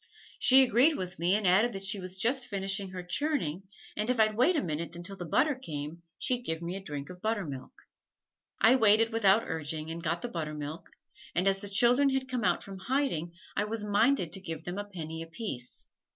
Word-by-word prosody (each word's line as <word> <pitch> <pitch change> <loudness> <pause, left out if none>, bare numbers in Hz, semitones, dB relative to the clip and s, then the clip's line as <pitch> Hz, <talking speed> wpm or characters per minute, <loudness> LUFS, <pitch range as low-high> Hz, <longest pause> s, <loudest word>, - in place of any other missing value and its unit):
She 265 +1 +8
agreed 260 +6 +4
with 180 -2 -6
me 175 +3 +3
and 210 -1 -1
added 200 +6 +4
that 195 0 -5
she 195 +1 -1
was 185 0 -6
just 245 +5 +1
finishing 195 -2 -2
her 185 -1 -7
churning 190 - -2 0.3
and 215 +3 -2
if 250 -2 +1
I'd 215 -1 +3
wait 260 +11 +3
a 305 - +1
minute 165 0 -3
until 175 +3 -7
the 175 -3 -7
butter 295 - +3
came, 160 - -7 0.2
she'd 250 -1 0
give 160 -9 -3
me 170 +2 -4
a - - -4
drink 145 -4 -6
of 180 0 -12
buttermilk. 195 -12 -3 0.9
I 245 +4 +6
waited 225 0 +4
without 225 -1 +4
urging 160 0 -3
and 165 +1 -6
got 165 +1 -2
the - - -1
buttermilk, 155 -3 -5 0.5
and 180 +2 +2
as 195 0 +2
the 205 - -5
children 245 +7 +4
had 265 -1 -1
come 250 -3 -2
out 175 -2 +1
from 195 -1 -9
hiding 250 - -1 0.2
I 205 - +1
was 215 0 -2
minded 210 - +2
to 195 - -2
give 165 -3 -6
them 175 +3 -5
a 205 - -4
penny 160 -5 -7
apiece. 165 - -4
195 Hz, 210 wpm, -30 LUFS, 170-230 Hz, 0.9 s, She